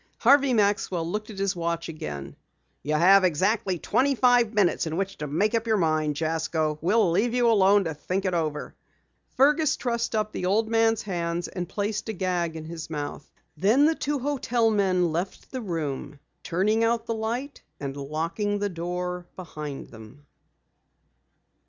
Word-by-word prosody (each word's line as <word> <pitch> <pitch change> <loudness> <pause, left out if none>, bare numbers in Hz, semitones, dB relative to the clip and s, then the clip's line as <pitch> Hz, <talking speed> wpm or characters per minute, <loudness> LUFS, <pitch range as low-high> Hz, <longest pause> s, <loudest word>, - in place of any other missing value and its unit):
Harvey 275 +2 +5
Maxwell 200 -6 +1
looked 210 +5 -4
at 210 - -9
his 195 -1 0
watch 170 -1 -2
again. 75 - -6 0.5
"You 150 +3 -1
have 190 +5 +6
exactly 185 +3 +1
twenty 275 - +1
five 245 -3 +4
minutes 205 -6 +2
in 160 +1 -3
which 195 0 -3
to 150 - -3
make 195 +10 0
up 230 0 0
your 220 -1 +3
mind, 155 -4 +1
Jasko. 160 -1 -1
We'll 200 +2 +3
leave 225 +7 +1
you 245 -1 +3
alone 200 -1 +5
to 160 -3 -3
think 185 +6 -3
it 185 - 0
over." 155 -3 -2 0.6
Fergus 295 +2 +4
trussed 235 -2 -2
up 215 0 0
the 180 - -3
old 215 +4 +2
man's 225 -1 +2
hands 175 -3 -2
and 175 -2 -5
placed 210 +2 -3
a - - -1
gag 180 -3 -1
in 160 -1 -7
his 160 -1 -7
mouth. 145 -2 -6 0.2
Then 215 - +4
the 320 - +4
two 295 -1 -2
hotel 245 -4 0
men 185 -5 +2
left 175 +4 -4
the 260 - -4
room, 150 - -4 0.2
turning 210 +6 +1
out 230 0 +1
the 230 - -2
light 235 +6 -4 0.2
and 140 -1 -5
locking 165 +9 -2
the 205 0 -1
door 180 0 -4
behind 150 -6 -7
them. 110 +6 -14
190 Hz, 170 wpm, -26 LUFS, 165-225 Hz, 0.6 s, have